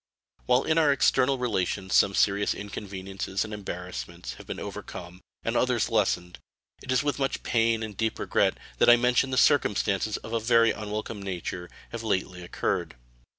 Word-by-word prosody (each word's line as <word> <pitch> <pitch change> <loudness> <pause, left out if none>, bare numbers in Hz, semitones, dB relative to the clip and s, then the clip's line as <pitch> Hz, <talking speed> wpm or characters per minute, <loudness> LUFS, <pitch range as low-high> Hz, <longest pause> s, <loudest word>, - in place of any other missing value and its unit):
While 125 +1 +4
in 160 +1 +2
our 150 -3 +4
external 135 0 +3
relations 95 -5 -1
some 100 - +4
serious 100 0 +2
inconveniences 100 -1 -4
and 110 - -8
embarrassments 90 -3 -6
have - - -12
been - - -5
overcome 90 +1 -8 0.2
and 115 - -1
others 125 -2 +2
lessened, 90 -5 0 0.4
it 130 - -5
is 130 +1 +2
with 145 -1 -1
much 135 -1 -1
pain 115 -1 +2
and 110 -2 -6
deep 110 +2 -1
regret - - +1 0.2
I 120 - +8
mention 125 +2 +2
that 130 - -2
circumstances 105 -7 +2
of 110 - -9
a 115 - +2
very 115 0 +4
unwelcome 105 0 -5
nature 90 -2 -5 0.2
have 115 - -5
lately 95 -4 -2
occurred. 85 - -2
110 Hz, 160 wpm, -27 LUFS, 95-120 Hz, 0.4 s, I